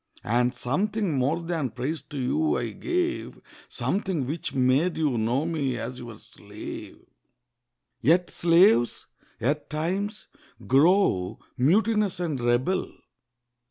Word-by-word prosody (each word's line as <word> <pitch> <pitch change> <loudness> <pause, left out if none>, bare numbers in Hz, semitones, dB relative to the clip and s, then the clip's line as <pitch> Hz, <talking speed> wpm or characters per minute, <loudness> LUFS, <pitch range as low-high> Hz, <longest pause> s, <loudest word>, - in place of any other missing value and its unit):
And 120 +3 +2
something 185 - -1
more 140 +6 +1
than 165 -6 -2
praise 130 +8 -3
to 145 - -10
you 145 +5 +1
I 120 -2 -3
gave— 345 - -2 0.3
Something 185 -8 -1
which 150 +6 -3
made 135 +6 +2
you 150 -5 +1
know 120 +6 0
me 145 -6 -1
as 125 0 -5
your 120 -3 -9
slave. - - -10 1.0
Yet 175 +4 +3
slaves, 165 -9 +4 0.3
at 145 +5 -1
times, 190 +7 -2 0.4
grow 140 - +3 0.2
mutinous 200 - +2
and 160 -6 -2
rebel. 120 +10 +1
150 Hz, 115 wpm, -26 LUFS, 125-180 Hz, 1.0 s, slaves